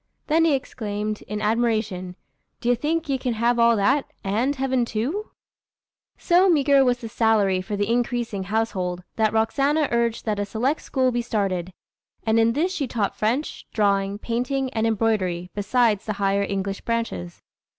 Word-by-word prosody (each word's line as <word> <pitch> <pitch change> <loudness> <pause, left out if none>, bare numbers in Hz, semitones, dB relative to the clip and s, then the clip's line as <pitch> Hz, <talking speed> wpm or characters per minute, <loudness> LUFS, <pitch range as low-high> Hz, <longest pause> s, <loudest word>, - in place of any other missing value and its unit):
Then 325 +1 +3
he 320 - +3
exclaimed, 215 -4 -4
in 210 +1 -4
admiration, 215 -5 0 0.4
"D'ye 245 +1 +2
think 315 +6 -1
ya 270 -2 0
can 250 -2 -1
have 235 +2 +1
all 235 0 +5
that, 265 +8 +1
and 230 +9 0
heaven 260 -2 +1
too?" 255 - -3 0.9
So 365 +2 +4
meagre 280 -4 +4
was 250 -1 +2
the 235 -2 -7
salary 210 -4 +2
for 205 +3 -4
the 205 0 -1
increasing 235 -4 -1
household, 185 -4 -2
that 220 -1 +3
Roxana 275 +7 +1
urged 235 -1 0
that 210 -2 -1
a 205 - 0
select 250 +9 -1
school 260 -2 +1
be 240 0 0
started; 195 -6 -2 0.5
and 225 0 +3
in 225 0 +3
this 345 +8 0
she 290 -7 -2
taught 215 -5 -1
French, 240 +8 -2
drawing, 200 -2 +1
painting, 250 +4 -2
and 225 0 +1
embroidery, 195 -6 0
besides 210 0 +1
the 215 - 0
higher 200 0 +1
English 195 0 -2
branches. 230 - -3
225 Hz, 160 wpm, -24 LUFS, 205-255 Hz, 0.9 s, all